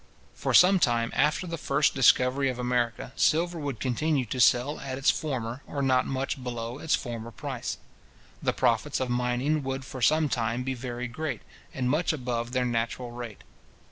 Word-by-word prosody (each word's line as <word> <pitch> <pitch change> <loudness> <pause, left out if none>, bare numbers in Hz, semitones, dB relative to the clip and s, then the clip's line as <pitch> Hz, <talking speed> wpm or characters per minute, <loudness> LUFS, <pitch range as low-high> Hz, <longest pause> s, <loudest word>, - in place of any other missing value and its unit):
For - - -1
some 185 +1 +7
time 115 -5 +2
after 150 +6 +2
the 165 -2 -5
first 140 +1 +2
discovery 135 +1 +4
of 125 - -3
America, 125 0 -1
silver 170 +2 +2
would 140 -6 -4
continue 135 +2 0
to 125 +3 -4
sell 125 +6 +4
at 130 -1 -5
its 135 - +4
former, 130 -4 -4
or 140 -1 -3
not 130 -1 +3
much 135 0 -3
below 120 +1 -5
its 160 - +2
former 115 -3 -6
price. 115 - -5 0.6
The - - +1
profits - - +1
of 130 -2 -1
mining 125 +5 0
would 135 -1 -4
for 130 0 -8
some 155 +5 +4
time 120 -1 -1
be 130 +1 -2
very 125 -1 -5
great, 125 0 -4 0.3
and 130 -2 -2
much 155 +6 +1
above 120 -4 -3
their 125 0 +1
natural 120 +1 -2
rate. 120 -3 -8
130 Hz, 175 wpm, -27 LUFS, 120-140 Hz, 0.6 s, some